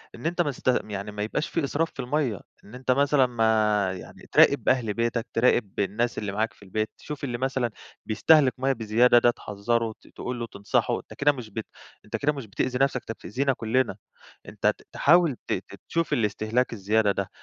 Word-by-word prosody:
إن -, -, -11 dB
أنت 175 Hz, +2 st, +1 dB
ما 150 Hz, -4 st, 0 dB
تست 130 Hz, -, -11 dB, 0.2 s
يعني 105 Hz, 0 st, -5 dB
ما 105 Hz, 0 st, -4 dB
يبقاش 150 Hz, +8 st, -2 dB
في 165 Hz, -, -1 dB
إسراف 155 Hz, +4 st, 0 dB
في -, -, -22 dB
المَيّة، 125 Hz, -, -1 dB, 0.2 s
إن 105 Hz, -, -13 dB
أنت 130 Hz, 0 st, -1 dB
مثلًا 140 Hz, +1 st, +4 dB
ما 110 Hz, -4 st, +2 dB
يعني 90 Hz, -, -11 dB
تراقب -, -, +5 dB
أهل 120 Hz, -5 st, +1 dB
بيتك، 115 Hz, +1 st, -1 dB
تراقب 115 Hz, -3 st, +2 dB
الناس 110 Hz, +4 st, 0 dB
اللي 105 Hz, -2 st, -3 dB
معاك 110 Hz, +3 st, -1 dB
في -, -, -19 dB
البيت، 110 Hz, +3 st, -2 dB
تشوف 150 Hz, -1 st, -8 dB
اللي 125 Hz, -4 st, -2 dB
مثلًا 130 Hz, -2 st, -1 dB, 0.3 s
بيستهلك 135 Hz, +5 st, +4 dB
مَيّة 135 Hz, +1 st, +1 dB
بزيادة 120 Hz, +1 st, +4 dB
ده 120 Hz, 0 st, +4 dB
تحذّره، 115 Hz, +2 st, -2 dB
ت -, -, -20 dB
تقول 125 Hz, -1 st, -6 dB
له 115 Hz, -, -3 dB
تنصحُه، 100 Hz, -2 st, 0 dB
أنت -, -, -13 dB
كده 145 Hz, +1 st, +3 dB
مش 125 Hz, -6 st, -8 dB
بت 110 Hz, +1 st, -5 dB, 0.4 s
أنت -, -, -5 dB
كده 150 Hz, +1 st, +1 dB
مش 135 Hz, -4 st, -7 dB
بتأذي 125 Hz, +5 st, -2 dB
نفسك، 135 Hz, -2 st, +2 dB
أنت -, -, -7 dB
بتأذينا 130 Hz, +7 st, -1 dB
كلنا، 120 Hz, -2 st, 0 dB, 0.5 s
أنت -, -, -1 dB
ت -, -, +1 dB
تحاول 165 Hz, -2 st, +4 dB
تت -, -, -1 dB, 0.3 s
تشوف 165 Hz, 0 st, 0 dB
الإستهلاك 110 Hz, +3 st, 0 dB
الزيادة 105 Hz, 0 st, +2 dB
ده، 100 Hz, -1 st, -3 dB
120 Hz, 195 wpm, -26 LUFS, 110-135 Hz, 0.5 s, تراقب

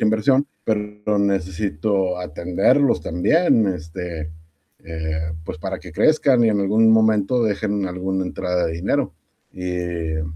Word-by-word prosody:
inversión, 130 Hz, +6 st, +2 dB, 0.2 s
pero 105 Hz, -1 st, -1 dB
necesito 95 Hz, -1 st, 0 dB
atenderlos 90 Hz, -, +1 dB
también, 115 Hz, -, +2 dB
este, 80 Hz, -2 st, -5 dB, 0.5 s
eh, 80 Hz, 0 st, -4 dB
pues, 80 Hz, -, -6 dB
para 95 Hz, +3 st, -4 dB
que 90 Hz, -, -12 dB
crezcan 140 Hz, -, +3 dB
y 115 Hz, -, +4 dB
en 105 Hz, -2 st, +1 dB
algún 110 Hz, +3 st, +4 dB
momento 110 Hz, +1 st, +3 dB
dejen 105 Hz, -2 st, -1 dB
alguna 95 Hz, +1 st, -2 dB
entrada 90 Hz, -1 st, -1 dB
de 80 Hz, -, -3 dB
dinero, 85 Hz, +3 st, -1 dB, 0.4 s
eh, 85 Hz, -3 st, -3 dB
95 Hz, 120 wpm, -21 LUFS, 85-110 Hz, 0.5 s, y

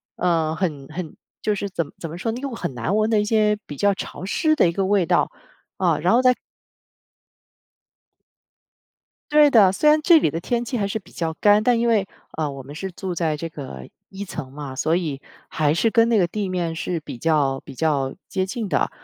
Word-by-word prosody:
呃， 165 Hz, -3 st, +1 dB
很 155 Hz, -6 st, -3 dB
很 160 Hz, 0 st, -7 dB, 0.2 s
就 210 Hz, -, +1 dB
是 200 Hz, 0 st, -4 dB
怎 170 Hz, -4 st, -2 dB
么 -, -, -15 dB
怎 165 Hz, -, -5 dB
么 165 Hz, -, -7 dB
说 225 Hz, +5 st, -2 dB
那 235 Hz, -, -5 dB
个 280 Hz, -, -2 dB
很 175 Hz, -, -4 dB
难 125 Hz, -, -1 dB
闻 215 Hz, +1 st, +2 dB
的 220 Hz, -, +3 dB
一 210 Hz, -, +1 dB
些， 210 Hz, -1 st, +2 dB
比 145 Hz, -, -8 dB
较 200 Hz, +7 st, +2 dB
潮 190 Hz, -, -7 dB
湿 310 Hz, -, +1 dB
的 305 Hz, -, +4 dB
一 -, -, -1 dB
个 195 Hz, +2 st, -1 dB
味 195 Hz, -2 st, +2 dB
道。 -, -, +2 dB, 0.5 s
啊， -, -, +3 dB
然 175 Hz, +6 st, +2 dB
后 245 Hz, -, +5 dB
在 255 Hz, -1 st, +5 dB, 3.0 s
对 295 Hz, -1 st, +6 dB
的， 205 Hz, -6 st, +6 dB
虽 300 Hz, +10 st, +1 dB
然 305 Hz, +1 st, +5 dB
这 335 Hz, +1 st, +7 dB
里 225 Hz, -, +2 dB
的 165 Hz, -, -3 dB
天 240 Hz, +6 st, -2 dB
气 245 Hz, -, -4 dB
还 200 Hz, -3 st, 0 dB
是 210 Hz, -, -2 dB
比 205 Hz, -, -13 dB
较 165 Hz, -1 st, -3 dB
干， 205 Hz, 0 st, +5 dB
但 240 Hz, 0 st, +3 dB
因 235 Hz, -, +1 dB
为， 210 Hz, -4 st, +2 dB, 0.3 s
呃， 155 Hz, -2 st, -1 dB
我 135 Hz, -1 st, -8 dB
们 140 Hz, +3 st, -10 dB
是 190 Hz, +5 st, -5 dB
住 180 Hz, +1 st, -5 dB
在 160 Hz, -3 st, -1 dB
这 165 Hz, -, -4 dB
个 135 Hz, -, -9 dB, 0.2 s
一 195 Hz, +1 st, -7 dB
层 130 Hz, -8 st, -7 dB
嘛， 140 Hz, -2 st, -7 dB
所 155 Hz, +4 st, +1 dB
以 150 Hz, -6 st, -2 dB, 0.3 s
还 150 Hz, -2 st, +1 dB
是 225 Hz, +7 st, +2 dB
跟 230 Hz, 0 st, +4 dB
那 230 Hz, -, +3 dB
个 185 Hz, -, +4 dB
地 195 Hz, +2 st, -3 dB
面 175 Hz, -3 st, -2 dB
是 170 Hz, +1 st, -2 dB
比 130 Hz, -5 st, -8 dB
较 145 Hz, -4 st, +1 dB
比 -, -, -11 dB
较 140 Hz, -3 st, 0 dB
接 185 Hz, -, -1 dB
近 220 Hz, +2 st, -4 dB
的。 -, -, +1 dB
185 Hz, 240 characters per minute, -22 LUFS, 155-215 Hz, 3.0 s, 这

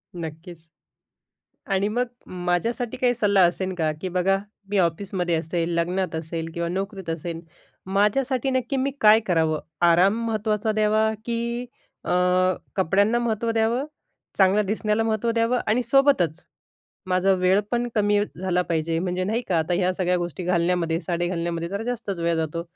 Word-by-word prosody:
नक्कीच 165 Hz, 0 st, -8 dB, 1.1 s
आणि 195 Hz, +1 st, +1 dB
मग 245 Hz, +4 st, 0 dB, 0.4 s
माझ्यासाठी 230 Hz, +7 st, -1 dB
काही 250 Hz, -1 st, +2 dB
सल्ला 200 Hz, -4 st, +3 dB
असेन 185 Hz, +2 st, -2 dB
का? 160 Hz, -3 st, 0 dB
की 185 Hz, -, -3 dB
बघा 185 Hz, +2 st, +2 dB, 0.3 s
मी 205 Hz, -, +1 dB
ऑफिसमध्ये 175 Hz, 0 st, 0 dB
असेल, 165 Hz, +1 st, -2 dB
लग्नात 175 Hz, +1 st, -1 dB
असेल 160 Hz, 0 st, -4 dB
किंवा 170 Hz, 0 st, -2 dB
नोकरीत 190 Hz, -1 st, -4 dB
असेल. 165 Hz, +1 st, -4 dB, 0.5 s
माझ्यासाठी 245 Hz, +7 st, +1 dB
नक्की 260 Hz, +1 st, -1 dB
मी 265 Hz, +1 st, 0 dB
काय 215 Hz, +1 st, +7 dB
करावं? 160 Hz, -4 st, +1 dB, 0.3 s
आराम 190 Hz, +6 st, +4 dB
महत्त्वाचा 215 Hz, -1 st, 0 dB
द्यावा, 215 Hz, +1 st, +2 dB
की 235 Hz, +1 st, -2 dB, 0.4 s
अ, -, -, -4 dB, 0.7 s
कपड्यांना 200 Hz, +5 st, +2 dB
महत्त्व 230 Hz, -1 st, -1 dB
द्यावं? 225 Hz, +4 st, +1 dB, 0.5 s
चांगलं 195 Hz, +2 st, +4 dB
दिसण्याला 215 Hz, +1 st, 0 dB
महत्त्व 225 Hz, +1 st, 0 dB
द्यावं? 230 Hz, +2 st, +1 dB
आणि 230 Hz, +4 st, +2 dB
सोबतच 240 Hz, -, +3 dB, 0.6 s
माझा 185 Hz, +1 st, +2 dB
वेळपण 205 Hz, +6 st, +1 dB
कमी 205 Hz, -1 st, +3 dB, 0.2 s
झाला 180 Hz, -1 st, +1 dB
पाहिजे. 165 Hz, -1 st, -1 dB
म्हणजे 180 Hz, +1 st, -1 dB
नाही 225 Hz, +5 st, -1 dB
का 175 Hz, -3 st, +2 dB
आता 160 Hz, +2 st, 0 dB
ह्या 185 Hz, +1 st, +1 dB
सगळ्या 180 Hz, -1 st, +1 dB
गोष्टी 175 Hz, 0 st, -4 dB
घालण्यामध्ये 170 Hz, -2 st, +1 dB
साडी 175 Hz, -1 st, -2 dB
घालण्यामध्ये 170 Hz, -1 st, -2 dB
जरा 200 Hz, +3 st, -4 dB
जास्तच 225 Hz, -7 st, -4 dB
वेळ 170 Hz, 0 st, +1 dB
जातो. 160 Hz, +1 st, -2 dB
190 Hz, 150 wpm, -24 LUFS, 170-220 Hz, 1.1 s, काय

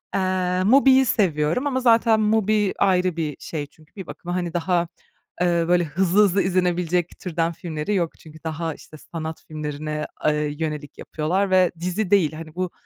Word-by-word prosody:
Eee, 185 Hz, -1 st, 0 dB
MUBI'yi 265 Hz, +3 st, +6 dB
seviyorum 180 Hz, -, +1 dB
ama 260 Hz, -2 st, 0 dB
zaten 230 Hz, -2 st, +4 dB
MUBI 215 Hz, -1 st, +2 dB
ayrı 185 Hz, -2 st, +2 dB
bir 155 Hz, -4 st, -3 dB
şey 150 Hz, -3 st, -5 dB
çünkü 155 Hz, +2 st, -24 dB
bir 190 Hz, -3 st, -8 dB
bakıma, 175 Hz, 0 st, -6 dB
hani, 175 Hz, -2 st, -2 dB
daha, 175 Hz, 0 st, 0 dB, 0.5 s
eee, 170 Hz, -1 st, +2 dB
böyle, 175 Hz, 0 st, +3 dB
hızlı 185 Hz, +5 st, +2 dB
hızlı 195 Hz, -1 st, +3 dB
izlenebilecek 180 Hz, -2 st, 0 dB
türden 165 Hz, -2 st, -1 dB
filmleri 165 Hz, +3 st, -3 dB
yok 170 Hz, -4 st, 0 dB
çünkü 155 Hz, 0 st, -14 dB
daha, 160 Hz, 0 st, -3 dB
işte, 155 Hz, -, -14 dB
sanat 160 Hz, +1 st, -7 dB
filmlerine, 150 Hz, 0 st, -4 dB, 0.2 s
eee, 150 Hz, -1 st, +1 dB
yönelik 150 Hz, -2 st, -4 dB
yapıyorlar 185 Hz, +6 st, -1 dB
ve 185 Hz, -1 st, +4 dB
dizi 180 Hz, +3 st, -2 dB
değil. 175 Hz, -7 st, +4 dB
Hani, 155 Hz, +1 st, -9 dB
bu 185 Hz, -1 st, -2 dB
175 Hz, 165 wpm, -23 LUFS, 155-190 Hz, 0.5 s, MUBI'yi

